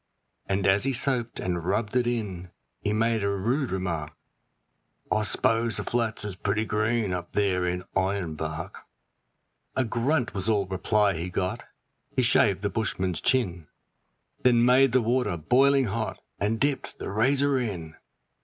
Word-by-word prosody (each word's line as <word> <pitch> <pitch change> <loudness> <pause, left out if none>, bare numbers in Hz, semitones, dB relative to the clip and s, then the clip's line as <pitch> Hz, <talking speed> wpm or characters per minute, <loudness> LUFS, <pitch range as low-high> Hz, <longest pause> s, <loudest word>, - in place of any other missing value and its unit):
And 95 -1 0
as 95 +1 +4
he 135 0 0
soaped 120 -1 0
and 90 -2 -2
rubbed 105 +5 -1
it 125 -1 +2
in 100 -7 -3 0.3
he 105 - -2
made 110 0 +1
a 100 - +1
rude 120 +8 0
remark: 85 -5 -3 1.0
'I 110 - +2
s'pose 115 +1 +1
the - - -2
flats 115 -3 -1
is 105 - -3
pretty 105 +3 -1
green 110 -1 0
up 90 -1 -5
there 95 -3 +1
in 90 +1 -2
Ironbark.' 80 -5 -2 0.9
A 130 - +2
grunt 125 +3 0
was 100 +2 0
all 105 -3 +2
reply 100 +2 +1
he 85 +2 -4
got; 90 +1 -3 0.5
he 130 - +3
shaved 100 -4 +3
the 100 - +1
bushman's 95 -5 -1
chin, 95 - 0 0.7
Then 120 -1 +4
made 130 +1 +5
the 130 -1 +3
water 115 -5 0
boiling 135 - +3
hot 100 - -3 0.2
and 110 +2 0
dipped 140 -1 -1
the - - -5
razor 135 +5 +2
in. 90 -10 -4
105 Hz, 155 wpm, -26 LUFS, 95-120 Hz, 1.0 s, made